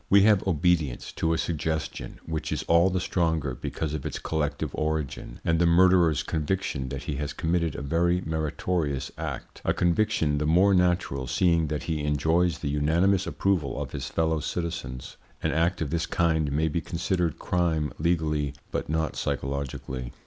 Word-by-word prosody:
We 100 0 +7
have 105 -2 +4
obedience 80 -6 +1
to 80 - -1
a 80 - +2
suggestion, 80 -7 -3
which 80 -1 -3
is - - -1
all 85 +3 +4
the 95 0 0
stronger 80 -7 0
because 75 +4 -4
of 75 -3 -3
its 75 -3 -3
collective 75 -3 -2
origin, 75 -3 -3
and 80 -1 +2
the 85 - +4
murderer's 85 -2 +5
conviction 75 -4 -2
that 65 -1 -5
he 70 - -3
has 75 0 -3
committed 85 -2 0
a - - -5
very 85 +5 +2
meritorious 80 -3 -2
act, - - -6
a - - +1
conviction 85 -5 +2
the 75 - 0
more 90 +5 +5
natural 90 -8 +1
seeing 85 +2 +2
that 75 0 -3
he 80 -3 -2
enjoys 80 +3 +2
the 70 - -3
unanimous 85 +7 +2
approval 90 -9 0
of - - -4
his - - -4
fellow 80 -1 +1
citizens. 80 -6 -4 0.3
An - - +1
act 85 +2 +1
of 70 - -5
this 85 0 0
kind 80 -4 +1
may 80 +3 +1
be 80 +2 -1
considered 85 -1 -1
crime 80 -6 0
legally 75 -3 0 0.2
but - - -3
not 80 0 -1
psychologically. 65 -2 -3
80 Hz, 170 wpm, -27 LUFS, 75-85 Hz, 0.3 s, We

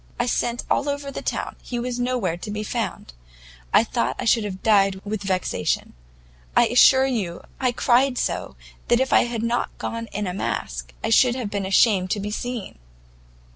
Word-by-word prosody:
I 240 - +2
sent 240 -1 -1
all 285 - +1
over 285 0 -3
the - - -6
town, - - -3
he 245 - -5
was 245 0 -3
nowhere 245 -9 0
to 175 +5 -8
be 210 +1 -3
found; 210 - -4 0.6
I - - +6
thought 125 +3 -1
I - - -4
should 230 -1 +3
have 190 -2 -6
died 195 -3 +3
with 210 0 -3
vexation; 185 - -1 0.6
I - - +7
assure 260 +2 +6
you 205 -10 -2 0.2
I 255 -2 +2
cried 250 +2 +2
so - - -2 0.3
that 240 - +3
if 265 0 +1
I - - +5
had 235 -2 -3
not 235 +1 -1
gone 230 0 -4
in 210 0 -4
a 180 - -3
mask, 195 - -4
I 225 - -1
should 245 +2 +5
have 240 -6 -4
been 200 -2 -2
ashamed 190 -1 +3
to 205 - 0
be 205 +1 -4
seen. 240 - -5
225 Hz, 190 wpm, -23 LUFS, 195-245 Hz, 0.6 s, I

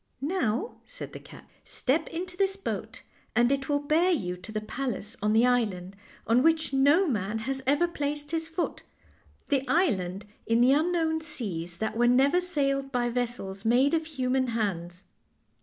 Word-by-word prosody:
" - - -45 0.2
Now," 240 - -1
said - - -8
the - - -7
cat, - - -14
" - - -40
step 310 +5 0
into 360 +2 -5
this 390 +1 +1
boat 395 - -5 0.3
and 240 +2 +4
it 275 0 -1
will 290 - +3
bear 310 +5 +2
you 185 - 0
to 185 +5 -10
the 215 - -2
palace 225 -1 -4
on 210 +1 +2
the 225 +3 +5
island 200 -7 0 0.3
on 230 +3 +4
which 320 -1 +2
no 285 +8 +5
man 215 - -1
has 265 +4 -3
ever 290 +6 +3
placed 295 -2 -3
his 325 -1 -1
foot 325 +2 -3 0.7
the 275 -3 +2
island 200 - +1 0.2
in 230 +1 +3
the 250 +3 +6
unknown 320 +1 +1
seas 185 - -5
that 220 +2 -2
were 240 +1 +3
never 275 +8 +4
sailed 275 -6 -1
by 245 -2 0
vessels 235 -5 -3
made 250 +6 +3
of 320 -1 +1
human 260 -3 0
hands. 185 -6 -3
265 Hz, 175 wpm, -28 LUFS, 220-315 Hz, 0.7 s, the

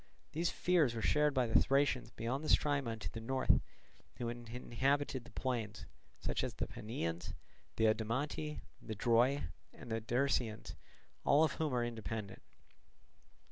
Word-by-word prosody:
These 165 +2 0
fears 160 -10 +2
were 115 - -2
shared 150 -1 +3
by 130 -1 +3
the 115 - +5
Thracians 135 -2 +2
beyond 125 +6 -3
the 155 - -3
Strymon 140 -6 +2
to 110 - -5
the 115 - -6
north, 130 +3 +2 0.5
who 120 -1 -3
inhabited 125 +3 -1
the - - -13
plains, 115 -5 -3 0.3
such - - -1
as - - -3
the - - -1
Panaeans, 85 -6 -4 0.4
the 110 - +3
Odomanti, 130 +8 0 0.2
the 110 - -5
Droi, 120 +6 +3 0.3
and 115 - -11
the 115 0 0
Dersaeans, 120 -1 0 0.5
all 145 +3 +5
of 155 - +3
whom 155 0 -1
are 120 -1 +2
independent. 110 -3 -5
120 Hz, 145 wpm, -36 LUFS, 115-140 Hz, 0.5 s, the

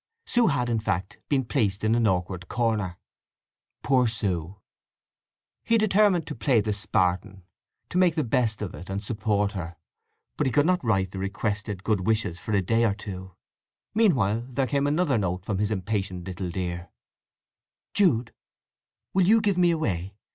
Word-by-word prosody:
Sue 240 -2 +3
had, 125 - +1
in 115 -2 0
fact, 95 -3 -3
been 135 -3 +1
placed 105 -6 0
in 110 +1 +3
an 115 -1 +3
awkward 90 -1 -1
corner. 110 -7 -1 0.9
Poor 130 -3 +3
Sue! 100 -4 -2 1.0
He 230 - +3
determined 205 -5 +3
to - - -5
play 120 +1 +2
the 105 0 0
Spartan; 95 -1 -1 0.5
to 180 - +1
make 180 -3 +4
the 155 - +1
best 115 -3 0
of 100 - -5
it, 90 - -10
and 100 +1 -3
support 105 -1 0
her; 90 -4 -6 0.6
but 145 - +1
he - - 0
could 145 +3 +3
not 180 -2 +2
write 95 -5 +1
the 95 - -6
requested 100 0 -3
good 100 -4 0
wishes 105 -6 0
for - - -6
a 100 -2 +2
day 115 +5 +2
or 105 -4 +2
two. 95 -3 -8 0.6
Meanwhile 125 - +3
there 130 +1 0
came 140 +2 0
another 145 -4 +2
note 90 -1 -2
from 100 -3 -2
his 105 0 +1
impatient 95 -3 -2
little 95 -1 -4
dear: 85 -1 -4 1.0
Jude, 135 - +2 0.8
will 185 -2 +3
you 225 +3 +6
give 205 -4 +1
me 175 -1 +5
away? 100 - -1
110 Hz, 170 wpm, -26 LUFS, 95-135 Hz, 1.0 s, you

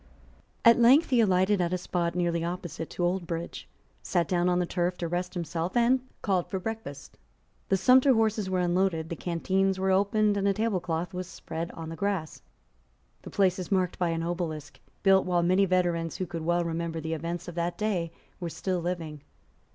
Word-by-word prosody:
At 235 +1 +7
length 265 +7 +6
he 250 - +4
alighted 190 -1 +3
at 175 0 0
a - - +1
spot 175 -1 -2
nearly 170 -2 0
opposite 170 -2 -5
to 175 - -4
Oldbridge, 170 -2 -3 0.3
sate 175 -3 0
down 175 -1 +1
on 180 - +2
the 180 - +1
turf 175 0 -1
to 170 - -3
rest 180 +2 -3
himself, 170 +3 -2
and 245 +2 +4 0.2
called 185 -4 +1
for 190 - -2
breakfast. 190 -8 -7 0.5
The 195 - +3
sumpter 260 +6 +5
horses 220 -3 +1
were 185 -1 +1
unloaded: 175 -2 +1
the 170 - -3
canteens 190 +3 0
were 190 0 +1
opened; 205 +2 +2
and 200 0 +1
a 200 - +3
tablecloth 180 -5 -1
was 180 0 -4
spread 165 -2 -6
on 165 -1 -7
the 165 - -6
grass. 190 -3 -2 0.8
The - - -9
place 190 -2 +2
is 185 - -6
marked 185 -2 +1
by 175 -2 +1
an 165 0 -1
obelisk, 160 -4 -4 0.2
built 195 -1 +5
while 175 -1 +2
many 185 +3 +4
veterans 175 -3 0
who 185 - -2
could 165 -1 -6
well 175 +1 +1
remember 165 0 -3
the 160 +1 -3
events 170 +3 -4
of 175 - -6
that 170 +1 -2
day 185 -6 -1 0.3
were 175 -2 -4
still 185 +2 -2
living. 165 -4 -4
180 Hz, 190 wpm, -28 LUFS, 170-195 Hz, 0.8 s, At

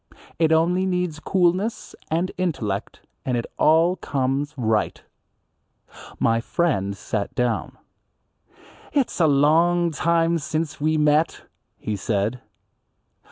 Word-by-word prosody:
It 160 -1 +3
only 175 +4 +2
needs 180 -4 -1
coolness 185 +5 0 0.2
and 170 +4 0
intellect, 120 - -3 0.2
and 125 -2 -1
it 115 - -2
all 165 +4 +4
comes 135 +2 -1
right. 110 -3 0 1.2
My 115 0 +2
friend 100 - -1
sat 100 +1 -4
down. 125 -2 -1 1.2
"It's 275 -9 0
a 165 - +5
long 165 +4 +3
time 165 +1 +1
since 155 0 -3
we 155 +1 +2
met," 150 +1 +2 0.3
he 105 - -3
said. 105 +4 -1
155 Hz, 110 wpm, -23 LUFS, 125-170 Hz, 1.2 s, a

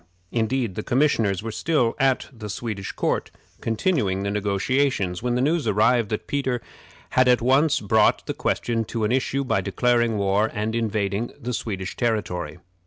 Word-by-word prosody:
Indeed, 115 -1 0
the 110 - -4
commissioners 115 -7 +1
were 115 - -4
still 125 -2 +1
at 135 -2 +2
the 110 -3 -8
Swedish 100 -1 -4
court, - - -1 0.3
continuing 110 - 0
the 100 - -1
negotiations, 100 -1 0
when 120 0 0
the 125 - +1
news 155 +2 +1
arrived 115 +2 +3
that 110 - -3
Peter 130 -3 -1 0.5
had 130 0 +4
at 125 -1 +5
once 135 +5 +3
brought 105 +1 +3
the - - -3
question 115 -1 -1
to 115 +1 -3
an 105 - +1
issue 130 +2 0
by 110 -7 +1
declaring 120 +3 +1
war 100 +2 +2
and 105 +1 -1
invading 110 -1 -1
the 125 +1 -4
Swedish 95 -5 -4
territory. 90 -9 -2
115 Hz, 165 wpm, -24 LUFS, 100-125 Hz, 0.5 s, at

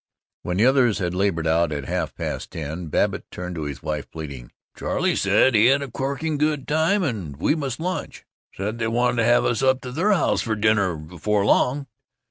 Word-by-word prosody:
When 90 0 -3
the 110 - +4
others 130 -4 +4
had 90 -3 -2
labored 90 -3 0
out, 80 0 +2
at 70 -2 -4
half - - -2
past - - -4
ten, 80 +2 -5
Babbitt 75 - -1
turned 90 0 -6
to 80 -3 -4
his 70 -1 -6
wife, 75 -2 -3
pleading, 70 -6 -8 0.2
"Charley - - 0
said 130 - +3
he 110 +1 +5
had 140 +2 +3
a 135 - -7
corking 140 +4 -2 0.3
time 160 +6 +2
and 95 - -3
we 85 - +2
must 140 -5 -3
lunch 180 +3 -4 0.3
said 105 +4 -4
they 115 - 0
wanted 120 +2 +1
to 115 - +2
have 120 +1 +4
us 120 - +1
up 130 -1 +3
to 125 - -7
the 175 +11 +1
house 195 - +2
for 110 -1 -1
dinner 105 -4 +2
before 90 +6 -2
long." 135 +6 +2
110 Hz, 200 wpm, -23 LUFS, 85-135 Hz, 0.3 s, he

